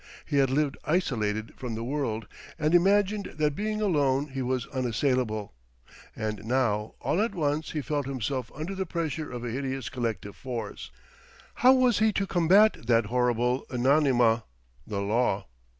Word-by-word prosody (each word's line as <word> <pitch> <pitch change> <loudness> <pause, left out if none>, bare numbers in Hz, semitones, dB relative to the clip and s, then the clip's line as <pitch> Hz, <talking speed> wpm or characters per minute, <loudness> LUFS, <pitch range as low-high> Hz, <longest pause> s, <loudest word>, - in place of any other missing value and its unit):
He 145 - -1
had 135 -2 +4
lived 140 +1 0
isolated 110 - -1
from 120 -3 -5
the 115 - -4
world, 120 -4 -2 0.3
and 155 0 +1
imagined 200 +3 +3
that 150 -2 +1
being 215 +2 -2
alone 145 -6 +2
he 135 0 -4
was 130 0 -1
unassailable; 125 - -1 0.6
and 110 -1 -4
now 110 -3 0
all 185 - +1
at 220 -2 -1
once 150 -1 -1
he 150 -2 -2
felt 145 -3 -2
himself 130 -1 -3
under 155 +6 -4
the 190 -1 -3
pressure 160 -3 -3
of 125 -1 -5
a 120 - -3
hideous 135 -1 -3
collective 115 -5 -3
force. 120 -5 -6 0.6
How 255 +1 +6
was 255 -4 +3
he 220 0 +4
to 195 - 0
combat 185 - +4
that 115 -2 +4
horrible 125 +1 +1
anonyma, 125 -3 +3 0.4
the 100 -2 -2
law? 105 -1 +1
135 Hz, 155 wpm, -27 LUFS, 115-160 Hz, 0.6 s, How